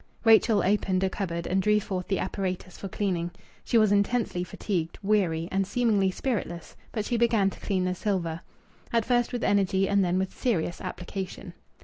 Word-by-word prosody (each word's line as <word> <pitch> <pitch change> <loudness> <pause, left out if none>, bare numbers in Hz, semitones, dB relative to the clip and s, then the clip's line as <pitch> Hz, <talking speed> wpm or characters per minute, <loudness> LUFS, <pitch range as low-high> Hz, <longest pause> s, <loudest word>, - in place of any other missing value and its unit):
Rachel 220 -2 +5
opened 190 -1 +1
a 190 - +1
cupboard 170 -4 -3
and 190 +1 +1
drew 210 +2 +3
forth 185 -3 -4
the 195 - 0
apparatus 185 -1 -3
for 195 - -6
cleaning. 180 -3 -1 0.3
She 235 - +2
was 215 -2 +4
intensely 205 -2 +1
fatigued, 175 -2 -3
weary, 180 -6 +1
and 195 0 0
seemingly 215 -5 +2
spiritless, 185 -5 -3 0.2
but 215 -2 -2
she 240 - 0
began 225 -4 +3
to - - -12
clean 190 -3 -1
the 185 - 0
silver 175 -4 -2 0.5
at 230 -2 +2
first 240 -1 +2
with 245 -2 -3
energy 195 -1 +2
and 200 0 +3
then 180 0 +1
with 190 0 -2
serious 175 -9 -1
application. 185 +1 -6
195 Hz, 175 wpm, -27 LUFS, 180-210 Hz, 0.5 s, Rachel